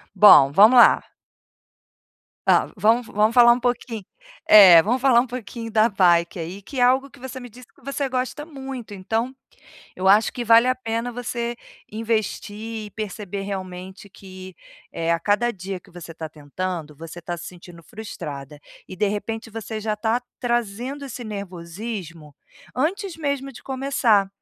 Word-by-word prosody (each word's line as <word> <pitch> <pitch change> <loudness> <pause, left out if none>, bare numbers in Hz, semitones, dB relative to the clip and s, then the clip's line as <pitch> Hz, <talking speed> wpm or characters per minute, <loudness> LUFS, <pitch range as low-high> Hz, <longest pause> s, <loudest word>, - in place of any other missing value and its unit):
Bom, 140 -10 +8
vamos 215 - +6
lá. - - +6 1.4
Ah, - - +4
vamos 225 +4 +2
vamos 215 +2 +1
falar 240 -1 +7
um 245 - -3
pouqui 240 -4 -3 0.4
É, 185 -6 +9
vamos 240 +5 0
falar 255 -3 +5
um 255 - -5
pouquinho 235 -1 -7
da 220 +1 +4
bike, 175 -3 +2
aí, 175 +5 -6
que 260 +6 -7
é - - +4
algo 260 +3 +3
que 280 - -18
você 260 +1 -8
me 245 -1 -10
disse 245 +2 -15
que - - -27
você 275 +1 -3
gosta 255 +3 -3
muito, 265 -7 -8
então 225 +6 -3 0.6
eu 185 - -3
acho 210 +3 +4
que 245 - -5
vale 230 +2 +6
a 255 - +2
pena 230 -1 -4
você 240 0 -4 0.3
investir 220 0 -3
e - - -12
perceber 205 -2 -6
realmente 190 0 -7
que, 185 -1 -12 0.4
eh, 165 0 -2
a 170 - +1
cada 210 +6 +1
dia 190 -1 -6
que - - -21
você 170 -2 -10
tá 160 -1 -7
tentando, 155 +1 -6
você 165 +2 -10
tá 175 0 -5
se - - -9
sentindo 175 -1 -13
frustrada, 150 -10 -8 0.3
e 185 - -9
de 205 - +1
repente 220 +2 -4
você 220 0 -6
já 215 0 -2
tá 225 +3 0 0.2
trazendo 240 +3 -2
esse 245 -2 -7
nervosismo 180 - -7 0.4
antes 355 +6 -2
mesmo 280 -3 -3
de - - -13
começar. 260 -7 +1
220 Hz, 165 wpm, -22 LUFS, 185-245 Hz, 1.4 s, É